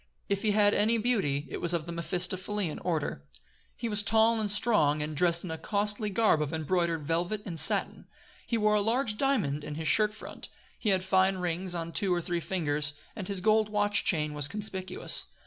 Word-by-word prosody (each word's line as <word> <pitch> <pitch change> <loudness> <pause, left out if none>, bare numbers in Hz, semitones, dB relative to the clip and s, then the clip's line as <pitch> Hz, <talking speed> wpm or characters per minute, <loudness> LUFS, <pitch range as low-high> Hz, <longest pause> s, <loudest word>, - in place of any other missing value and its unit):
If 200 0 0
he 215 - 0
had 205 0 +3
any 225 +3 +2
beauty 195 - 0
it - - -5
was 170 0 +1
of 160 -2 -3
the 170 - -6
Mephistophelean 180 +2 -1
order. 155 - -3 0.5
He 235 - -4
was 210 -2 +2
tall 225 +1 +3
and 210 - -2
strong, 205 -9 +2
and 155 0 -5
dressed 170 +2 +2
in 180 - -6
a 160 - -6
costly 210 +3 -1
garb 200 -6 +2
of 150 -1 -2
embroidered 165 0 -1
velvet 175 +7 -2
and 170 -4 -3
satin. - - +2 0.4
He 235 - 0
wore 210 -1 +2
a 210 - +2
large 225 +1 0
diamond 185 - 0
in 150 - -6
his 160 +1 -4
shirt 210 +4 +4
front, - - -8 0.3
he 215 - -1
had 190 -2 +1
fine 190 0 +2
rings 180 0 -2
on 170 -1 -4
two 190 +3 0
or 175 - +2
three 175 0 -2
fingers, 150 -5 -1 0.2
and 190 -4 -6
his 195 -2 -2
gold 215 +1 +2
watch 205 -1 +1
chain 150 -3 0
was 145 -1 +1
conspicuous. 190 -1 +1
185 Hz, 200 wpm, -29 LUFS, 165-210 Hz, 0.5 s, shirt